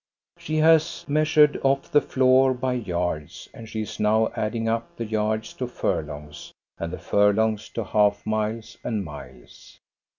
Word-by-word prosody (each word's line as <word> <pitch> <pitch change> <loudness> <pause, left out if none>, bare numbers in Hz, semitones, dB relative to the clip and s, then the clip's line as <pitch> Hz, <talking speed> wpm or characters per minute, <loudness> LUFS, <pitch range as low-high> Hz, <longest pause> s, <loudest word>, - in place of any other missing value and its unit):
She 155 - -4
has 160 0 +3
measured 150 0 +3
off 135 0 0
the 145 - +5
floor 130 0 +3
by 125 +1 -1
yards, 90 -9 -3
and 115 -1 -11
she 110 - -3
is - - -8
now 110 +1 +2
adding 115 +1 -2
up 115 0 -2
the 115 - -3
yards 110 0 -2
to 125 - -4
furlongs 75 -10 -4 0.3
and 85 - -4
the - - -5
fur 105 0 +3
longs 110 0 0
to 115 - -4
half 105 0 +1
miles 110 +1 -3
and 105 -4 -2
miles. 75 -2 -12
110 Hz, 160 wpm, -24 LUFS, 105-130 Hz, 0.3 s, the